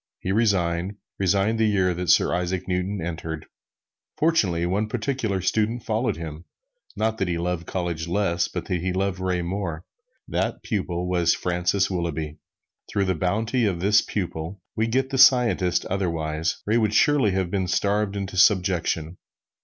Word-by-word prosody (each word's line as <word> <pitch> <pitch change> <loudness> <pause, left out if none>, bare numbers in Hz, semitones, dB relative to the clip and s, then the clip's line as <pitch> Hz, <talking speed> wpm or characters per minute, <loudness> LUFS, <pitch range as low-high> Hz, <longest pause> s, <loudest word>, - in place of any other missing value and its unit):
He 95 - -3
resigned 95 -3 +1 0.2
resigned 100 +4 +2
the 110 - +4
year 95 -3 +2
that 90 0 -3
Sir 75 - +4
Isaac 90 +1 -2
Newton 95 +2 -1
entered. 80 -2 -5 0.7
Fortunately, 100 - +2
one 100 +5 0
particular 110 -4 -1
pupil 110 +5 +1
followed 110 -2 -1
him, 80 0 -7 0.5
not 110 +1 -1
that 95 - 0
he 85 -1 -1
loved 85 -1 -2
college 85 -3 -3
less, 85 -2 +1
but - - -5
that 90 -3 -2
he 90 +1 -1
loved 95 0 -1
Ray 90 -1 -1
more. 85 -3 -4 0.4
This - - -1
pupil 90 -5 -2
was 85 -2 +2
Francis 90 +3 0
Willughby. 80 -4 -3 0.5
Through 100 - 0
the 95 - +1
bounty 110 +8 0
of 90 -4 -1
this 100 +3 +4
pupil 90 -1 -4 0.2
we 110 +1 +1
get 130 +3 0
the 135 - -1
scientist 120 -9 +5
otherwise, 80 -4 -2
Ray 110 +3 +2
would 110 -1 +1
surely 145 -4 +4
have 95 -2 -1
been 95 -2 0
starved 100 +2 0
into 100 -1 -4
subjection. 90 -4 +2
95 Hz, 160 wpm, -24 LUFS, 85-105 Hz, 0.7 s, scientist